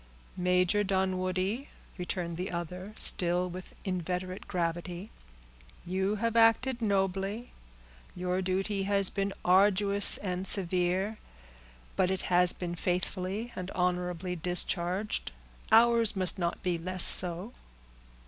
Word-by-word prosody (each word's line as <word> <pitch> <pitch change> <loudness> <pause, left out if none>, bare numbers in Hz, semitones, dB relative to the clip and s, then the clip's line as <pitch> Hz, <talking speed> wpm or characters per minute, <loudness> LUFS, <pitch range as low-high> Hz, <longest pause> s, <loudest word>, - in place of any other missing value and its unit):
"Major 180 +2 +1
Dunwoodie," 190 +5 -2 0.3
returned 180 -2 -5
the 180 +3 -5
other, 180 +3 -6
still 180 -2 +3
with 185 +1 -10
inveterate 185 0 -4
gravity, 175 +2 -4 0.7
"you 190 +3 -1
have 230 +2 -2
acted 235 +2 +3
nobly; 195 +2 -2 0.6
your 180 +1 -2
duty 195 +2 -2
has 200 0 0
been 200 0 -2
arduous 200 +2 +3
and 185 -1 -4
severe, 185 +3 +3 0.8
but 185 -1 +1
it 190 -1 -3
has 180 0 +4
been 175 -1 -6
faithfully 185 +5 -4
and 185 0 -6
honorably 180 0 -2
discharged; 180 - -2 0.4
ours 230 -1 +4
must 185 -1 +3
not 170 -1 -3
be 175 -2 -1
less 185 +1 +5
so." 180 +6 +5
185 Hz, 110 wpm, -29 LUFS, 180-200 Hz, 0.8 s, less